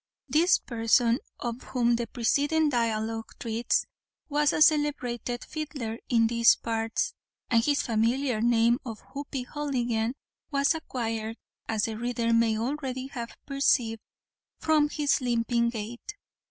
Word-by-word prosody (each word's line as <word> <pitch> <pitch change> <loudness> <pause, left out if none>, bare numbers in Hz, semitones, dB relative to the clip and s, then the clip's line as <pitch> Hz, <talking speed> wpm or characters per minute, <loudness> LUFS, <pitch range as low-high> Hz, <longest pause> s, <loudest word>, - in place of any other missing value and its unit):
This 315 +7 +4
person, 230 +1 +2 0.2
of 240 0 -4
whom 240 -2 +1
the 235 0 -2
preceding 290 +7 +1
dialogue 225 -3 -1
treats, 230 0 0 0.4
was 295 0 +3
a - - -1
celebrated 265 -6 +2
fiddler 275 -7 -5
in 230 -2 +4
"these 230 0 +5
parts," 225 - -2 0.4
and 230 -1 +4
his 285 +2 +2
familiar 235 +1 +1
name 235 +1 +3
of 225 -5 -7
Hoppy 280 -2 -4
Houligan 245 -5 -1 0.3
was 280 +1 +2
acquired, 225 -7 -4 0.3
as 220 -2 0
the 220 -1 -2
reader 235 -1 0
may 230 -1 +3
already 260 +1 -3
have 240 -4 -7
perceived, 250 -5 +1 0.6
from 305 -2 +2
his 295 -1 +1
limping 235 -1 +1
gait. 235 - -6
240 Hz, 125 wpm, -28 LUFS, 230-280 Hz, 0.6 s, these